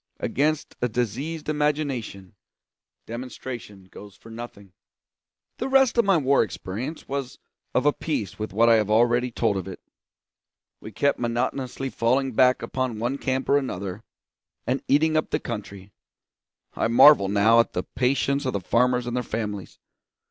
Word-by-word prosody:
Against 150 +2 -1
a 125 - +1
diseased 125 +8 -3
imagination, 145 -10 -2 0.7
demonstration 120 -4 -8
goes 100 +2 -13
for 115 +3 -15
nothing. 110 -5 -10 0.9
The 260 - -2
rest 265 -2 +4
of 235 - +3
my 195 -3 +4
war 140 -2 +3
experience 110 - -5
was 140 -2 -4 0.4
of - - +2
a 145 - +4
piece 110 - -4
with 110 - -4
what 115 +4 +3
I 115 -1 +6
have 105 -1 0
already 120 +3 +3
told 110 -4 0
of 95 - -5
it. 95 - -8 1.0
We 110 - -10
kept 140 +7 0
monotonously 125 +2 -2
falling 130 +3 +1
back 125 +2 +3
upon 130 -4 -2
one 120 +5 -2
camp 130 -1 -2
or 140 - +4
another, 100 -5 -5 0.6
and 130 +2 -1
eating 155 +3 +3
up 155 - +1
the - - 0
country 100 -4 -7 0.8
I - - 0
marvel 115 -2 +7
now 105 +3 +4
at 115 - +2
the 90 - -2
patience 140 +2 0
of 130 - -1
the 100 - -1
farmers 125 +5 +1
and 120 0 -3
their 125 - 0
families. 105 -4 -5
120 Hz, 155 wpm, -24 LUFS, 105-140 Hz, 1.0 s, marvel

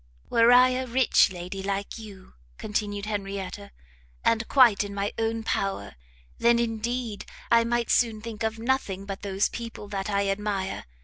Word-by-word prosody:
"Were 230 +1 +5
I 250 +1 +7
a 255 0 -2
rich 250 -4 +4
lady, 180 +2 -6
like 200 +3 -3
you," 200 -4 -12 0.2
continued 205 -1 -3
Henrietta, 200 -1 -5 0.6
"and 230 0 +2
quite 240 -7 +5
in 200 0 -7
my 200 +1 -2
own 225 0 -1
power, 195 -3 -2 0.5
then, 235 0 +4
indeed, 235 -1 -2 0.3
I 230 0 +5
might 235 0 0
soon 225 -3 +2
think 225 0 -8
of 220 0 -1
nothing 225 -5 -1
but 195 -1 -6
those 195 0 0
people 230 -3 -7
that 200 0 -3
I 200 -1 +1
admire! 195 -1 -2
215 Hz, 160 wpm, -26 LUFS, 200-235 Hz, 0.6 s, I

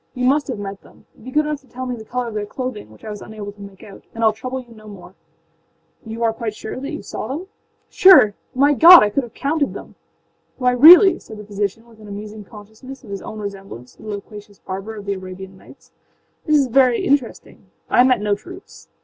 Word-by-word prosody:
You 250 0 -2
must 285 +3 +2
have 255 -5 -4
met 200 -1 -7
them. - - -21 0.2
Be 255 - -9
good 300 +3 +1
enough 300 -1 -4
to 270 - -26
tell 255 +1 -7
me 250 -1 -4
the 220 - -10
color 245 +2 -4
of - - -10
their 210 -1 -4
clothing, 250 - -6
which 110 - -17
I 215 - -6
was 210 - -8
unable 210 -2 -8
to 205 0 -17
make 200 -1 -12
out, 200 - -13
and 230 - -3
Iâll 220 -1 +4
trouble 255 +4 -6
you 240 -2 -14
no 215 -1 -16
more.â 165 -2 -18
âYou 230 +1 -4
are 225 -1 +1
quite 225 -2 -5
sure 220 +4 -7
that 275 +2 -6
you 305 - -7
saw - - -6
them?â 295 +9 -5 0.5
âSure? 365 - +7 0.2
My 285 +3 +4
God, 340 +5 +9
sir, - - +4
I 210 - +1
could 275 - 0
have 240 -3 -12
counted 290 0 -1
them!â 250 -1 -6
âWhy, 245 - -7
really,â 360 +4 +8
said 220 - -12
the 210 - -10
physician, 205 +2 -4
with 225 -2 -20
an 210 - -13
amusing 210 +1 -9
consciousness 220 +7 -13
of 215 - -12
his 195 - -5
own 215 - -9
resemblance 195 - -9
to - - -21
the 215 - -9
loquacious 205 0 -9
barber 195 +4 -7
of 205 -1 -10
the 200 - -2
Arabian 190 0 -9
Nights, 190 - -19 0.6
âthis 305 - +3
is 285 -2 +4
very 255 -1 +3
interesting. 275 -4 -2 0.2
I 245 - +4
met 255 -4 +2
no 210 -1 0
troops. 360 - -11
220 Hz, 235 wpm, -19 LUFS, 200-255 Hz, 0.6 s, God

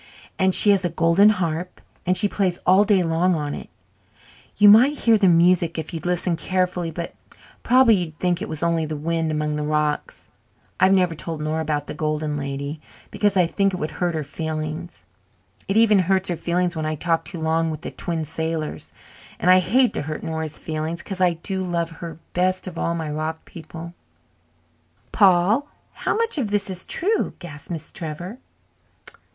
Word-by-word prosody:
And 190 -1 +3
she 205 - +5
has 195 -2 +2
a 175 - 0
golden 170 +5 +4
harp 180 -3 -2 0.3
and 185 0 +4
she 205 - +3
plays 190 -3 0
all 190 +3 +6
day 200 -3 +3
long 170 +2 +1
on 150 -2 -3
it - - -8 0.9
you 205 - +6
might 245 +8 +7
hear 230 -3 +4
the 205 -3 +3
music 170 -1 +3
if 160 +2 -5
you'd 165 +1 -4
listen 180 0 0
carefully, 180 +1 -1
but 170 +1 -6 0.5
prob'bly 250 -1 +5
you'd 170 -6 -2
think 180 -1 0
it - - -4
was 155 0 -3
only 170 -1 +1
the 155 0 -4
wind 165 +1 -1
among 150 -1 -1
the - - -2
rocks. 150 0 -2 0.5
I've 185 +1 +5
never 180 -3 +3
told 160 0 -6
Nora 155 +1 -2
about 150 -2 -2
the - - -6
Golden 155 -1 -2
Lady, 140 +2 -4 0.3
because 205 -2 +1
I 180 - +5
think 195 +2 0
it - - -4
would 155 -2 -3
hurt 175 -2 -2
her 155 - -2
feelings. 155 +3 -5 0.6
It 195 - 0
even 220 -3 +5
hurts 190 +1 +1
her 175 - 0
feelings 175 +1 -1
when 155 -1 -2
I 155 - -1
talk 165 +1 0
too 170 +1 -7
long 160 +1 +1
with 155 -2 -5
the - - -6
Twin 165 -2 -3
Sailors. 160 0 -4 0.5
And 180 - +3
I 185 - +7
hate 245 +8 +2
to - - -2
hurt 155 +1 -5
Nora's 160 -1 -4
feelings, 160 +1 -4
because 190 -2 -6
I 180 -1 +4
do 190 +3 -3
love 170 -2 -2
her 165 -1 -8 0.2
best 185 +1 0
of 180 -3 -7
all 170 - -1
my 160 -2 -4
rock 155 +1 -4
people." 170 0 -10 1.2
"Paul! 200 +8 +4 0.3
How - - -2
much 460 -8 0
of 230 -6 -1
this 205 -1 +1
is 185 -1 -2
true?" 425 +5 0
gasped 150 -4 -11
Miss 165 -3 -6
Trevor. 175 - -6
170 Hz, 190 wpm, -22 LUFS, 160-185 Hz, 1.2 s, might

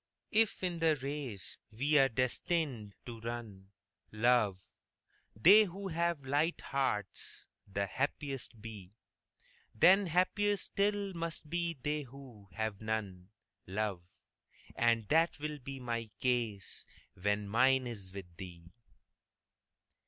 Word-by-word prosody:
If 220 -3 +2
in 175 -2 -1
the 160 -1 +4
race 135 - -5
we 140 +7 +3
are 135 0 +5
destined 130 - -1
to 115 -2 -7
run, 110 -4 -6 0.4
love, 110 -3 +3 0.8
They 200 - +8
who 195 +1 -6
have 170 -4 0
light 145 +5 +1
hearts 130 -8 -2 0.2
the 100 0 -1
happiest 135 +1 -3
be, 105 -3 -9 0.8
Then 190 - +6
happier 200 +4 +2
still 200 0 0
must 165 -2 -4
be 170 +1 -1
they 150 +1 0
who 125 -6 -12
have 110 -1 -3
none, 105 -4 -3 0.4
love. 100 -1 -2 0.7
And 115 -2 +3
that 165 +2 +3
will 150 0 -4
be 135 +1 -7
my 115 -2 -3
case 115 -6 -1 0.3
when 105 +2 -1
mine 130 +4 +4
is 100 -6 -5
with 90 -3 -9
thee. 85 -3 -10
125 Hz, 115 wpm, -33 LUFS, 105-160 Hz, 0.8 s, They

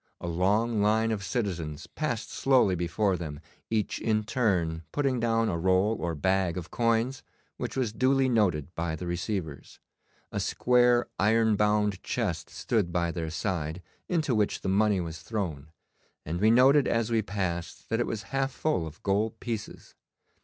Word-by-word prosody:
A - - -7
long 105 +6 +1
line 110 +2 +2
of 105 -3 -2
citizens 90 -8 -3
passed 135 -8 -3
slowly 130 -8 +3
before 90 +3 0
them, 75 -4 -6 0.3
each 110 -2 -1
in 110 -1 +1
turn 90 -9 0
putting 135 -4 0
down 115 -1 +2
a 85 - -1
roll 95 +5 +3
or 85 0 -2
bag 95 +2 +1
of 90 -1 -6
coins 115 +3 +1 0.4
which 125 0 -4
was 120 -5 0
duly 130 +2 +3
noted 90 - +1
by 85 -1 -2
the 90 - -6
receivers. 85 - -4 0.5
A - - -2
square 120 -1 +3
iron 110 +2 +3
bound 105 -1 +1
chest - - -2
stood 105 -7 -1
by 85 -1 0
their 80 -1 -3
side, 85 -1 -3 0.3
into 160 -7 +1
which 105 -2 +1
the - - -2
money 100 0 +3
was 80 -2 -5
thrown, 85 -10 -4 0.6
and 85 +4 -3
we 110 - +5
noted 130 +5 +6
as 115 0 0
we 115 -1 +3
passed 95 -5 -4
that 115 - 0
it 120 - 0
was 105 -2 -3
half 135 0 +1
full 130 - -1
of 80 +3 -12
gold 105 +3 0
pieces. 115 -4 -6
105 Hz, 165 wpm, -28 LUFS, 85-115 Hz, 0.6 s, noted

